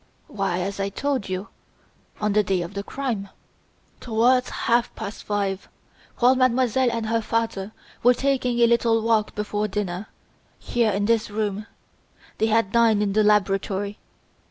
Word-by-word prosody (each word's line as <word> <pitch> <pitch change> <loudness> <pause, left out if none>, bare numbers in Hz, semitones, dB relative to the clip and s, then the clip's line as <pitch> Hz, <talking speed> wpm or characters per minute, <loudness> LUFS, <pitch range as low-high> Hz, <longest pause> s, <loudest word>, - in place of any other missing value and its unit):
"Why 195 -4 -2
as 200 +2 -4
I 195 0 -1
told 265 0 -2
you 185 +3 -4 0.7
on 210 -1 0
the 210 - +4
day 190 -3 0
of 170 +3 -8
the 200 - -3
crime, 220 -4 -4 0.7
towards 245 +2 +2
half 235 0 +1
past 200 - -7
five 200 -2 -2 0.5
while 250 +1 +5
Mademoiselle 255 -1 +2
and 230 -1 -2
her 225 +1 0
father 220 -3 -2 0.3
were 245 +1 +5
taking 260 -3 0
a - - +7
little 230 -1 +2
walk 220 -2 +1
before 210 0 -2
dinner, 195 0 -3 0.5
here 235 -2 0
in 205 0 0
this 230 0 +1
room: 210 0 -3 0.7
they 220 - +3
had 225 -3 +2
dined 225 -2 +4
in 200 -1 -1
the 215 +1 +3
laboratory. 200 -1 +1
215 Hz, 155 wpm, -24 LUFS, 200-235 Hz, 0.7 s, a